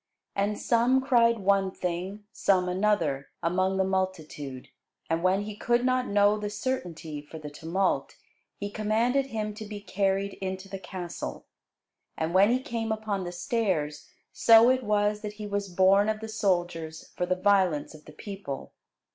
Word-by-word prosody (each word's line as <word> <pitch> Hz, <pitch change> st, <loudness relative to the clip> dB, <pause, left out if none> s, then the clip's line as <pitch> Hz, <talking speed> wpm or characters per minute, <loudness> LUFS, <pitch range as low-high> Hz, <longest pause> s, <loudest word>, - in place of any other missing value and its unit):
And 205 Hz, +1 st, 0 dB
some 240 Hz, +3 st, +3 dB
cried 235 Hz, -3 st, +4 dB
one 195 Hz, -1 st, +2 dB
thing, 185 Hz, +3 st, -4 dB
some 185 Hz, -4 st, +2 dB
another, 180 Hz, -8 st, 0 dB
among 185 Hz, +3 st, +1 dB
the 190 Hz, -, +3 dB
multitude: 160 Hz, -8 st, -3 dB, 0.4 s
and 165 Hz, +1 st, +1 dB
when 185 Hz, +3 st, +2 dB
he 210 Hz, 0 st, -6 dB
could 240 Hz, +3 st, +1 dB
not 255 Hz, 0 st, +2 dB
know 205 Hz, +1 st, +3 dB
the 210 Hz, 0 st, -3 dB
certainty 180 Hz, -, -4 dB
for 150 Hz, +2 st, -11 dB
the 150 Hz, -2 st, -8 dB
tumult, 170 Hz, +6 st, -1 dB, 0.4 s
he 205 Hz, 0 st, -5 dB
commanded 230 Hz, +6 st, +1 dB
him 215 Hz, -4 st, -3 dB
to 215 Hz, -, -8 dB
be 210 Hz, -1 st, -7 dB
carried 195 Hz, 0 st, 0 dB
into 190 Hz, 0 st, -4 dB
the 195 Hz, 0 st, -6 dB
castle. 180 Hz, -2 st, -6 dB, 0.7 s
And 160 Hz, +1 st, -1 dB
when 195 Hz, +3 st, +6 dB
he 255 Hz, +2 st, +1 dB
came 225 Hz, -2 st, -3 dB
upon 215 Hz, -3 st, -2 dB
the 175 Hz, -, -4 dB
stairs, 175 Hz, -6 st, -1 dB, 0.2 s
so 230 Hz, +2 st, +7 dB
it 260 Hz, 0 st, 0 dB
was, 210 Hz, -1 st, +1 dB
that 210 Hz, -1 st, -5 dB
he 210 Hz, 0 st, -7 dB
was 200 Hz, -1 st, -2 dB
borne 190 Hz, +3 st, +4 dB
of 215 Hz, 0 st, -1 dB
the 220 Hz, 0 st, -7 dB
soldiers 175 Hz, -6 st, -1 dB
for 180 Hz, -, -1 dB
the 185 Hz, -, +2 dB
violence 185 Hz, -6 st, +2 dB
of 155 Hz, -1 st, -14 dB
the 155 Hz, -, -13 dB
people. 195 Hz, -6 st, -7 dB
200 Hz, 165 wpm, -28 LUFS, 180-215 Hz, 0.7 s, so